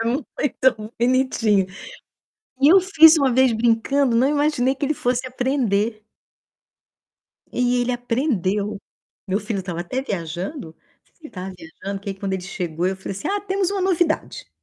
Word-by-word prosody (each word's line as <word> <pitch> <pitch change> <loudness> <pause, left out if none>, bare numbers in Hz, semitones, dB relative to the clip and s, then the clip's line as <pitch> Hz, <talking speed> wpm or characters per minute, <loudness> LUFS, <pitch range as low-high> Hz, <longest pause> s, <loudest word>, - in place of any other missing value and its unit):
É - - -1
muito 245 -3 -1
bonitinho. 235 -5 +2 0.9
E 280 - +6
eu 385 - +7
fiz 325 -4 +7
uma 275 -4 +2
vez 260 0 +4
brincando, 235 +3 +2
não 255 +4 +3
imaginei 290 -3 +1
que 275 - -3
ele 300 +2 0
fosse 250 -2 -1
aprender. 235 -5 -1 1.5
E 245 0 +1
ele 245 +1 0
aprendeu. 215 - -1 0.5
Meu 195 0 0
filho 220 -3 -3
estava 175 -2 -5
até 255 +10 -3
viajando, 180 - -5
não - - -38 0.3
sei - - -36
se - - -37
ele 305 - -9
estava 185 0 -7
viajando 190 +4 -7
que 200 - -8
aí - - -5
quando 195 -1 -3
ele 185 - -4
chegou 175 -2 -3
eu 190 +1 -1
falei 190 - -6
assim: 200 - -4
"Ah, 405 +1 0
temos 385 -2 -1
uma 400 -1 -2
novidade". 350 -4 0
245 Hz, 170 wpm, -22 LUFS, 200-280 Hz, 1.5 s, eu